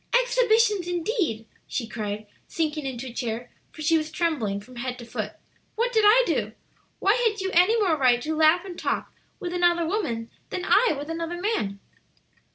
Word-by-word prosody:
"Exhibitions 460 -6 +2
indeed!" 345 - -1 0.2
she 240 - -2
cried, 215 -1 -4 0.2
sinking 305 -3 -2
into 255 -1 -5
a - - -11
chair, 240 0 -4 0.2
for 310 - -8
she 325 +2 +4
was 310 0 -4
trembling 290 - -1
from 245 +4 -14
head 250 +1 -4
to 240 - -9
foot. - - -4 0.4
"What 480 +2 0
did 440 -2 +4
I 480 +4 +7
do? - - -1 0.4
Why 400 - +3
had 435 -2 +1
you 380 0 -2
any 365 +7 +5
more 370 -7 +3
right 255 -4 +4
to 315 +1 -2
laugh 320 +4 +4
and 360 -3 -8
talk - - -2 0.3
with 355 -3 -4
another 345 -1 +3
woman 245 - -2 0.2
than 365 -1 -4
I 465 -2 +4
with 290 +3 -5
another 335 +1 -4
man?" 285 - -1
330 Hz, 180 wpm, -25 LUFS, 250-390 Hz, 0.4 s, I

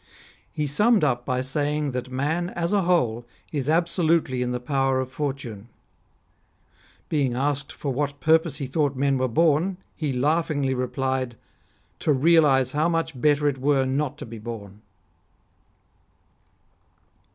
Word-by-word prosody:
He 150 - -2
summed 210 - +3
up 125 -4 0
by 130 -1 0
saying 145 +2 -1
that 125 0 -4
man 155 +7 -1
as 170 +2 -2
a 205 - +3
whole 125 -11 +1 0.3
is 145 -2 -2
absolutely 165 -5 +1
in 125 0 -1
the 125 - -2
power 135 0 0
of 130 0 -3
Fortune. 130 -7 -5 1.4
Being 140 -6 0
asked 140 +2 -1
for 140 -3 -4
what 140 +1 -2
purpose 160 -1 +2
he 140 - -3
thought 140 +1 0
men 135 0 +1
were 130 - +1
born, 165 +7 +2 0.2
he 150 -4 -2
laughingly 145 0 0
replied: 130 0 -2 0.3
" - - -39
To - - +1
realise 140 -3 +4
how 155 +4 +1
much 165 -6 -2
better 150 -1 +3
it 135 -2 -1
were 135 0 +2
not 140 +2 -1
to - - -7
be 115 -1 -9
born." 105 -3 -8
140 Hz, 145 wpm, -24 LUFS, 130-155 Hz, 1.4 s, realise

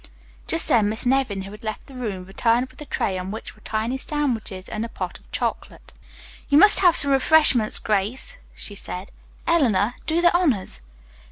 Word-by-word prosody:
Just 330 - +3
then 215 -4 +3
Miss 220 +4 0
Nevin, 245 -7 0
who 195 - -10
had 210 +1 -13
left 215 -1 -5
the 275 - -15
room, 210 -8 -5
returned 230 +6 0
with - - -16
a 295 - -9
tray 185 -1 -2
on 180 +1 -6
which 220 +3 -7
were - - -23
tiny 225 +4 -3
sandwiches 235 -11 -3
and 215 +1 -4
a 230 - -5
pot 185 -5 -6
of - - -26
chocolate. - - -5 0.6
"You 285 - +4
must 415 +6 +8
have 355 -3 +4
some 280 - +5
refreshment, 270 -5 +4
Grace," 225 - -2 0.2
she 205 - -5
said. 190 -1 -6 0.3
"Eleanor, 245 - +2
do 325 +1 +1
the 345 0 +3
honors." 275 - 0
230 Hz, 185 wpm, -22 LUFS, 205-290 Hz, 0.6 s, must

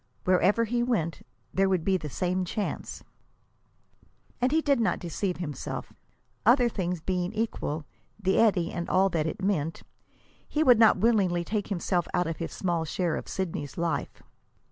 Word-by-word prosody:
Wherever 185 +5 +3
he 240 +2 0
went, 210 -10 -1 0.3
there 195 0 +3
would 185 -4 +1
be 190 +1 +2
the 155 -5 -3
same 180 +5 -1
chance. 200 +3 -4 1.4
And 250 +1 +3
he 315 - +4
did 285 -5 +2
not 225 - +1
deceive 180 +2 -3
himself. 150 -6 -5 0.5
Other 240 +1 +5
things 180 -5 -2
being 180 +1 -1
equal, 185 -9 -2 0.3
the 190 -2 +2
eddy 195 -7 +3
and 170 -1 -4
all 190 +1 +4
that 160 -3 0
it 175 - -5
meant, 165 -5 -1 0.7
he 310 - +1
would 250 -6 +6
not 220 -3 +6
willingly 190 -5 +2
take 210 +3 -2
himself 175 -3 -1
out 180 - +2
of 165 -1 -3
his 165 - -4
small 175 -3 -1
share 165 0 -1
of - - -5
Sidney's 165 -7 -4
life. 165 -4 -2
185 Hz, 165 wpm, -28 LUFS, 170-215 Hz, 1.4 s, would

